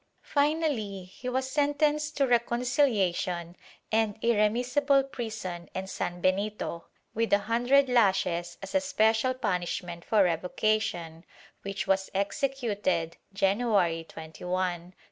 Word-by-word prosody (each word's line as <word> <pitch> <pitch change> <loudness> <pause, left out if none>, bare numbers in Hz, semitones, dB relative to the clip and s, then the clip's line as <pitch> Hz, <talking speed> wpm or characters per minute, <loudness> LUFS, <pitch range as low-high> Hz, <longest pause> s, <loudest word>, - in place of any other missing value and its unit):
Finally 285 - 0
he 190 +7 -7
was 260 +1 -1
sentenced 295 +1 +1
to 280 - +4
recon 240 -1 +1
ciliation 190 - +1 0.4
and 220 -1 +1
irremissible 245 +6 +3
prison 215 -9 -6
and 190 0 -3
sanbenito, 185 0 -2 0.3
with 230 +1 -1
a 200 - +6
hundred 245 +5 +3
lashes 190 -7 +1
as 195 - -7
a 285 - +3
special 240 -2 +2
punishment 175 -5 -3
for 215 -3 +3
revocation, 175 -1 -1 0.4
which 195 0 -4
was 190 0 +1
executed 200 - -1
January 195 -4 +1
21, 160 +2 -9
1646. 180 -1 -2
210 Hz, 110 wpm, -28 LUFS, 180-250 Hz, 0.4 s, a